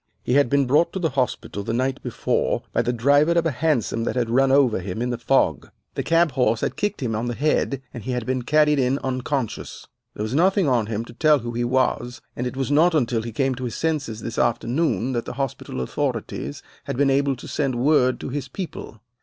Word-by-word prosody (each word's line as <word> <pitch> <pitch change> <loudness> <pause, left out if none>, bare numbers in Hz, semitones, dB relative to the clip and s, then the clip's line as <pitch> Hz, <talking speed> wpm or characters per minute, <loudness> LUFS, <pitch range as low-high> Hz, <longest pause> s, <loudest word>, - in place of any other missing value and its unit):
He - - -1
had 140 -2 +4
been 140 +1 +3
brought 145 +7 +3
to 190 - -3
the 165 -5 0
hospital 125 -6 -2
the 100 - -3
night 130 +2 -1
before 125 - -1
by - - +2
the 120 - 0
driver 145 +7 +3
of 170 -1 +2
a 165 - +2
hansom 130 -5 0
that - - -2
had 120 -2 0
run 135 +2 +3
over 135 -6 +4
him 90 +2 -5
in 125 +1 -1
the 120 - -2
fog. 115 - +1 0.2
The - - -2
cab 165 0 +3
horse 125 -4 +1
had - - -1
kicked 205 -8 -2
him 115 -3 -1
on 115 +3 -2
the 120 - -2
head, 140 -2 0
and 120 - -7
he 130 - -3
had 125 -2 -2
been 130 +1 -1
carried 150 +2 +3
in 130 +1 +2
unconscious. 130 -1 -3 0.3
There 105 - -3
was 110 +3 -3
nothing 185 +3 +3
on 120 -5 +2
him 110 +1 -3
to 120 - -12
tell 155 +4 +4
who 120 -2 -5
he 120 +1 -2
was, 125 0 0 0.2
and 125 - -2
it 130 - -6
was 135 +1 -1
not 160 +4 +4
until 120 -5 +1
he 115 +1 -6
came 135 +3 0
to 125 0 -5
his 120 - -4
senses 140 -9 -2
this 115 - -4
afternoon 120 +3 0
that 120 -1 -2
the - - -5
hospital 135 - -4
authorities 70 +2 -3 0.2
had - - -4
been 140 0 +3
able 140 0 +2
to 125 - -11
send 135 -4 -1
word 130 0 +3
to - - -5
his 135 0 -4
people. 160 - -7
130 Hz, 235 wpm, -23 LUFS, 120-145 Hz, 0.3 s, had